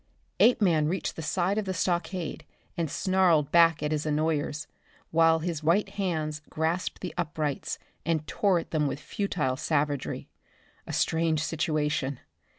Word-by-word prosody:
Apeman 175 -11 +4
reached 185 +4 -2
the - - -5
side 185 +5 0
of 210 - -3
the 190 -1 -2
stockade 175 0 -2 0.3
and 165 -3 -1
snarled 175 -3 +2
back 165 -2 +5
at 150 - 0
his 150 -1 0
annoyers, 155 0 0 0.5
while 165 0 +5
his 160 -1 -3
white 175 +6 +2
hands 160 -6 -2
grasped 165 +3 -1
the 180 - -4
uprights 150 -3 -2 0.3
and 160 -2 0
tore 195 +3 +2
at 165 - -5
them 150 -2 +1
with 140 - -3
futile 150 -9 -2
savagery. 145 -2 -1 0.6
A - - -5
strange 160 -1 +1
situation. 150 -4 -1
160 Hz, 145 wpm, -28 LUFS, 150-175 Hz, 0.6 s, back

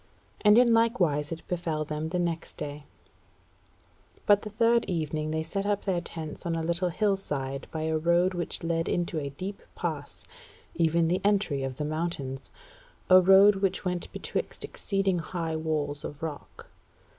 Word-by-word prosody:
And 210 +1 +7
in 240 -1 +6
likewise 180 -11 +2
it 165 - -7
befell 165 -3 -2
them 155 +1 -3
the 180 - -1
next 170 -2 -3
day; 145 0 -6 1.4
but 205 -1 +5
the 215 - -6
third 230 +2 +3
evening 155 -3 -2
they 160 0 -1
set 195 +5 -3
up 205 0 0
their 185 -3 0
tents 160 -2 -7
on 170 -2 -1
a 165 - -2
little 170 +2 +1
hillside 150 -9 -1
by 160 -1 -4
a 160 0 0
road 170 +3 +3
which 175 -2 -2
led 165 0 0
into 175 -2 -1
a 140 -2 -4
deep 185 +8 -6
pass, 155 -5 -4 0.5
even 165 0 +2
the 180 +3 +1
entry 200 -9 +1
of 135 -1 -4
the 150 - -2
mountains, 150 -4 -3 0.6
a 185 0 +9
road 195 +2 +7
which 195 0 -1
went 180 -1 -2
betwixt - - -4
exceeding 195 -3 -1
high 165 -1 -3
walls 150 -2 -2
of 145 +3 -7
rock. 155 -3 -7
170 Hz, 165 wpm, -28 LUFS, 155-190 Hz, 1.4 s, a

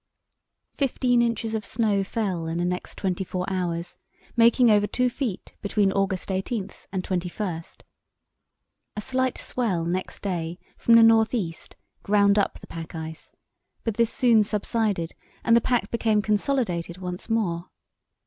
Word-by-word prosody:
Fifteen 250 -3 +2
inches 230 -1 0
of 220 -1 -1
snow 210 -3 +1
fell 190 -5 -2
in 165 +1 -2
the 175 - 0
next 180 0 -3
twenty 190 -1 -1
four 185 0 -3
hours, 175 -2 -3 0.4
making 235 0 +5
over 205 0 +4
two 250 +2 +1
feet 235 -8 -4
between 200 -1 +2
August 195 -1 -1
18 190 +1 -2 0.2
and 190 -2 -2
21. 180 -1 -3 1.3
A - - -1
slight 260 +1 0
swell 195 -10 -1
next 180 +2 -3
day 175 -3 -2 0.2
from 230 - +4
the 230 - +8
north 225 +1 +5
east 170 -8 -4 0.3
ground 200 0 +4
up 200 - 0
the - - -12
pack 165 0 -8
ice, 160 0 -7 0.5
but 225 -2 -2
this 230 -1 +3
soon 235 -4 +4
subsided, 205 -4 -1 0.3
and 230 - +5
the 235 - +5
pack 245 0 0
became 220 -3 +2
consolidated 205 -6 0
once 180 +3 -6
more. 185 -6 -1
205 Hz, 150 wpm, -25 LUFS, 180-230 Hz, 1.3 s, the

